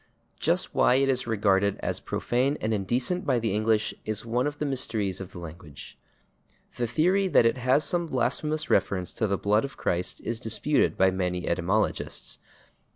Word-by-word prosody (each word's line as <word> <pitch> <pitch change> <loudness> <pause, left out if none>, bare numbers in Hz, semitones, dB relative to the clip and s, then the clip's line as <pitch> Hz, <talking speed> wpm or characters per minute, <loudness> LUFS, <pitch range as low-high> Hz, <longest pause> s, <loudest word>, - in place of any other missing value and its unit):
Just - - 0
why 125 - +4
it 135 +1 +3
is 130 -2 +1
regarded 100 -3 +2
as - - -1
profane 130 +4 -1
and 110 +1 -1
indecent 125 - 0
by 125 - +1
the 115 -4 -1
English 110 0 +1
is 110 0 -3
one 120 +4 0
of 145 0 -5
the 150 - -2
mysteries 110 -8 -1
of 95 0 -8
the - - -11
language. 85 -3 -10 0.8
The 120 - 0
theory 180 - +2
that 150 - +4
it 115 +2 +2
has 130 +4 +3
some 175 -1 -1
blasphemous 150 +4 0
reference 95 -2 0
to 110 - -1
the 100 0 0
blood 105 +3 +2
of 140 - -6
Christ 90 +1 -1
is 115 -1 -3
disputed 125 +6 +1
by 95 0 +4
many 90 -1 -2
etymologists. 95 +6 -1
115 Hz, 175 wpm, -27 LUFS, 95-130 Hz, 0.8 s, why